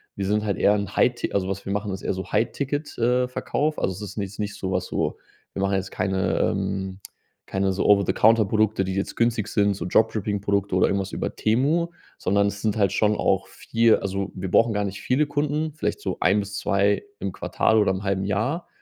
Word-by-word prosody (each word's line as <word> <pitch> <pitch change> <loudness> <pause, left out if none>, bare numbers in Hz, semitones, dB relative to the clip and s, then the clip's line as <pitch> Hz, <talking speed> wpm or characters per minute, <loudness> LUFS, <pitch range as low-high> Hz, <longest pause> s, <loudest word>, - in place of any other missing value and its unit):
Wir 100 - -3
sind 105 +1 +1
halt 100 -2 -1
eher 105 - +4
'n 100 -1 -4
High-Ti 120 -1 +1
also, 95 -2 0
was 95 0 -4
wir 100 - -3
machen, 100 0 -2
ist 95 - -7
eher - - 0
so 95 -1 -6
High-Ticket, 145 +5 -1
äh, 125 +2 +2
Verkauf. 150 +4 -1
Also 95 - 0
es 95 - -9
ist 100 0 -7
jetzt 100 0 -5
nicht 105 -1 -2
sowas, 95 -2 -2
so - - -2 0.4
wir 95 - -3
machen 100 0 +1
jetzt 95 0 -2
keine 95 -1 0
ähm, 95 0 -1 0.5
keine 95 0 0
so 95 - -1
Over-the-Counter 105 +2 +4
Produkte, 110 0 +1
die 95 - -3
jetzt 100 +1 -3
günstig 115 -3 +1
sind, 100 -1 +2
so 95 - -5
Dropshipping 105 0 +1
Produkte 100 -1 0
oder 90 - +4
irgendwas 95 -1 -1
über - - -3
Temu, 140 +10 +2 0.3
sondern 100 +2 +2
es 100 0 -4
sind 110 -1 0
halt 100 -4 +3
schon 105 0 +2
auch - - +1
viel 115 0 +2
also, 100 0 -3
wir 95 0 -5
brauchen 115 -1 +4
gar 105 - 0
nicht 100 0 -5
viele 135 +4 +2
Kunden, 150 +1 -1
vielleicht 155 - -3
so - - -3
1 95 +4 +3
bis 100 0 -6
2 100 0 +1 0.2
im 100 - -3
Quartal 110 - +1
oder 105 - +3
im 95 +1 -3
0,5 95 -1 -1
Jahr. 110 - -1
100 Hz, 215 wpm, -24 LUFS, 95-110 Hz, 0.5 s, eher